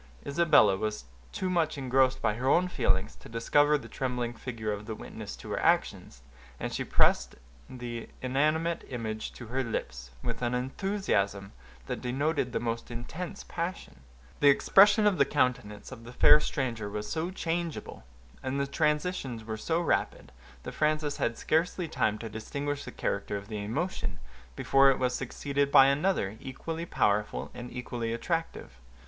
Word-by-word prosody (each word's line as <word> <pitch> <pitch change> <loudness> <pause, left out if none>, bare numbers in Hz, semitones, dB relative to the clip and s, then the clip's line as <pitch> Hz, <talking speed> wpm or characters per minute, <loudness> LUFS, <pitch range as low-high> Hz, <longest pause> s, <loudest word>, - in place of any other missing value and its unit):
Isabella 140 - +5
was 105 - -3 0.3
too 190 - -2
much 170 -4 +1
engrossed 130 -1 +2
by - - +3
her 125 +5 -1
own 180 +5 +4
feelings 110 - 0
to - - -14
discover 145 +6 +3
the 140 - -10
trembling 125 -2 -2
figure 115 -3 -4
of 105 +1 -7
the 110 - -4
witness - - -8
to - - -9
her - - -1
actions, - - 0 0.4
and - - -4
she - - -1
pressed - - +2 0.3
the 120 -2 -6
inanimate 155 +6 +1
image 110 -3 -4
to 120 - -9
her 130 +2 0
lips, 60 - -4
with 115 - -3
an 120 0 0
enthusiasm 125 - -1 0.3
that - - -4
denoted 135 +1 0
the - - -1
most 115 -1 -3
intense 160 +11 -6
passion. 170 - -5 0.4
The 145 - +6
expression 205 +9 +6
of 200 -5 +3
the - - +8
countenance 125 -7 -1
of 120 -3 -9
the 120 +1 -10
fair 150 - +7
stranger 120 -8 -2
was 105 +1 -4
so 165 +2 -2
changeable, 170 - -3 0.4
and 130 +1 -2
the 140 - +1
transitions 150 -5 -1
were 110 0 -4
so 160 +10 -1
rapid, 170 - -1 0.3
that - - -5
Frances 150 -1 0
had 115 - -1
scarcely 170 +2 0
time 110 -8 0
to 115 - -6
distinguish 140 +7 -4
the - - -7
character 100 0 -2
of 100 0 -10
the 105 -2 -4
emotion, 110 - -3 0.4
before 135 0 +5
it 135 - +3
was 125 -1 0
succeeded 140 +2 -1
by 135 - +9
another, 140 - +1
equally 165 +5 -5
powerful 105 -6 0
and 125 0 -8
equally 120 -2 -4
attractive. 165 - -3
130 Hz, 165 wpm, -29 LUFS, 110-155 Hz, 0.4 s, by